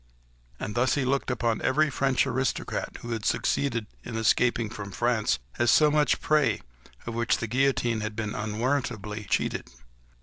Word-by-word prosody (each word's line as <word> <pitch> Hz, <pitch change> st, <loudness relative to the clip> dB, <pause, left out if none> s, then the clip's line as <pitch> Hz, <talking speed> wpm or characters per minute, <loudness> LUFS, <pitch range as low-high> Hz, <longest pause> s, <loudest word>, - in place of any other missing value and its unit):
And 105 Hz, -, -4 dB
thus 120 Hz, +3 st, +2 dB
he 140 Hz, -3 st, 0 dB
looked 135 Hz, +1 st, 0 dB
upon 120 Hz, -2 st, 0 dB
every 150 Hz, +3 st, +2 dB
French 135 Hz, -1 st, +2 dB
aristocrat, 130 Hz, 0 st, -2 dB
who 120 Hz, -, -6 dB
had 110 Hz, -2 st, -3 dB
succeeded 115 Hz, -3 st, 0 dB, 0.2 s
in 120 Hz, -, -6 dB
escaping 115 Hz, 0 st, +2 dB
from 100 Hz, -2 st, -6 dB
France, 120 Hz, +2 st, +1 dB, 0.2 s
as 120 Hz, 0 st, +3 dB
so 150 Hz, +4 st, +6 dB
much 150 Hz, 0 st, +3 dB
prey 145 Hz, -8 st, +2 dB, 0.4 s
of 120 Hz, -, -4 dB
which 115 Hz, 0 st, +1 dB
the -, -, -3 dB
guillotine 120 Hz, -1 st, +1 dB
had 110 Hz, 0 st, -4 dB
been 105 Hz, -2 st, -3 dB
unwarrantably 110 Hz, -1 st, -2 dB
cheated. -, -, 0 dB
120 Hz, 160 wpm, -27 LUFS, 110-135 Hz, 0.4 s, so